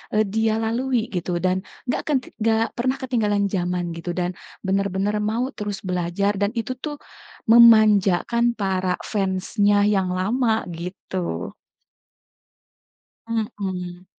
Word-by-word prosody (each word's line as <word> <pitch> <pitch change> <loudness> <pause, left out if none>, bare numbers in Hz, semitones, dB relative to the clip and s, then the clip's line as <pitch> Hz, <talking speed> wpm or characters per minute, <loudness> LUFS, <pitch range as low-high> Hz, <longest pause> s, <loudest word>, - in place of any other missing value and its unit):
eee, 215 - +4
dia 220 +2 +1
lalui 230 +1 0
gitu 175 -1 -2
dan 185 +2 +1 0.3
enggak 250 - -1
kan 295 - +3
t - - -13 0.2
enggak 225 +1 +2
pernah 255 +2 +1
ketinggalan 225 -6 0
zaman 180 -2 -1
gitu 170 +1 -5
dan 180 0 -1 0.3
benar-benar 195 +2 0
mau 230 +5 -1
terus 205 -2 -5
belajar 180 +3 0
dan 200 - +3
itu 230 +3 -2
tuh 295 +1 -4 0.5
memanjakan 225 0 +5
para 190 -2 0
fansnya 205 +1 +1
yang 195 -3 +2
lama 220 +4 +1
gitu. 175 - -5 1.7
Mhm. 185 -5 -4
205 Hz, 120 wpm, -23 LUFS, 185-225 Hz, 1.7 s, memanjakan